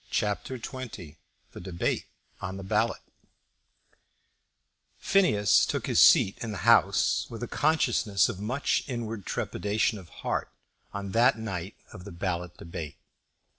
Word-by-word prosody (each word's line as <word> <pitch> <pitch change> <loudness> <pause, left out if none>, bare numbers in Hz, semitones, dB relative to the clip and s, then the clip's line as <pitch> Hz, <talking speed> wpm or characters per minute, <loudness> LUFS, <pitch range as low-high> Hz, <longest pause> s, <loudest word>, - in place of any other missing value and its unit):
CHAPTER 105 +5 -1
XX 115 - -8 0.3
The - - -10
Debate 90 -1 -2 0.4
on 95 +1 -5
the 95 - -7
Ballot 95 - 0 1.9
Phineas 110 - +3
took - - -1
his - - +3
seat 95 - +6
in 115 - -3
the 95 -4 -5
House - - +4
with 115 +1 -7
a - - -3
consciousness 120 -10 +2
of 105 -5 -5
much 125 +7 0
inward 115 -5 -5
trepidation 105 +1 -1
of 90 -3 -14 0.2
heart - - -1 0.4
on 100 -1 -5
that 120 +5 +4
night 95 -4 -5 0.2
of 90 - -10
the 100 - -8
ballot 85 -1 -4
debate. 80 -3 -7
105 Hz, 130 wpm, -28 LUFS, 95-115 Hz, 1.9 s, seat